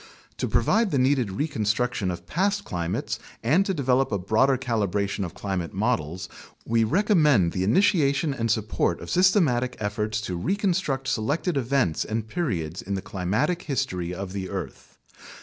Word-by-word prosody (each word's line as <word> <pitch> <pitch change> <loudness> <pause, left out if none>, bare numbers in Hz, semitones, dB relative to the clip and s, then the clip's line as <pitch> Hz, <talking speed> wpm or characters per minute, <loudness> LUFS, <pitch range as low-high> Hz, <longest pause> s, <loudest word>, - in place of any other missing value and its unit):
To - - -1
provide 225 -1 +2
the 145 - 0
needed 130 -3 +2
reconstruction 110 -3 -1
of 90 -1 -5
past 200 - 0
climates 85 -1 -3 0.2
and 150 +12 +4
to - - +1
develop 135 -3 +1
a 100 - +1
broader 110 +8 +2
calibration 100 -5 -1
of 90 - -6
climate 95 -4 -3
models, 95 -6 -1 0.4
we 115 0 +2
recommend 150 - +3
the 90 - -1
initiation 140 - +3
and 115 -3 -2
support 105 -5 0
of 85 - -7
systematic 160 - +3
efforts 105 +1 -2
to 90 -4 -4
reconstruct 180 - 0
selected 145 - 0
events 130 - +1
and 110 0 -3
periods 90 - -2
in 100 +1 -3
the 95 - -4
climatic 105 - -1
history 110 - -2
of 95 +1 -5
the 95 -2 -4
earth. - - -7
115 Hz, 150 wpm, -25 LUFS, 95-145 Hz, 0.4 s, and